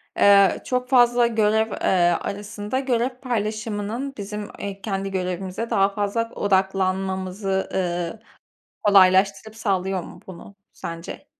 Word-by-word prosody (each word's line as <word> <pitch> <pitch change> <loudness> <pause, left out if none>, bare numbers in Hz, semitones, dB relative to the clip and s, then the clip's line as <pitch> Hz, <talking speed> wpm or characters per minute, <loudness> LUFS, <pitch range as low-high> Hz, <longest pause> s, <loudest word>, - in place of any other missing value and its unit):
Eee, 200 -1 +5
çok 250 0 -1
fazla 240 -2 +5
görev, 220 -1 +1
eee, 175 -2 +2
arasında 205 +4 -4
görev 255 -2 0
paylaşımının 220 +1 -3
bizim, 210 0 -6
eee, 200 -1 -6
kendi 195 -1 -3
görevimize 185 +4 -3
daha 195 0 +3
fazla 205 +3 -2
odaklanmamızı, 190 0 0
ııı, 175 +1 -2 0.6
kolaylaştırıp 200 +2 +4
sağlıyor 190 -3 -1
mu, - - -12
bunu 190 +2 -11 0.2
sence? 165 0 -8
200 Hz, 110 wpm, -23 LUFS, 190-220 Hz, 0.6 s, Eee